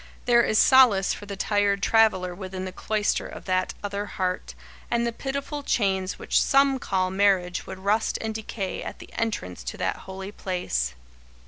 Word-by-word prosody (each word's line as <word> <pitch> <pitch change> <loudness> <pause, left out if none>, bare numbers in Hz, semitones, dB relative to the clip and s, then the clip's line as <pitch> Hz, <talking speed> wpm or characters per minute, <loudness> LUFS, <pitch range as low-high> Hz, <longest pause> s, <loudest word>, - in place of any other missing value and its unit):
There 240 -1 +5
is 215 - +1
solace 240 -8 +6
for 205 - -9
the 200 - -5
tired 200 0 +1
traveller 215 -5 +3
within 185 0 -6
the 185 - -5
cloister 210 +2 -1
of - - -10
that 185 -1 0
other 205 0 -3
heart, 185 -2 -3 0.3
and 235 0 +1
the 235 - 0
pitiful 280 +4 -4
chains 195 -7 0
which - - +1
some 275 -1 +3
call 185 -5 0
marriage 190 -2 +1
would - - -7
rust 205 +4 +1
and 220 -1 -3
decay 215 -3 -4
at - - -6
the - - -13
entrance 90 - -3
to - - -5
that - - -1
holy 190 +1 -8
place. 65 - -2
200 Hz, 175 wpm, -25 LUFS, 185-225 Hz, 0.3 s, solace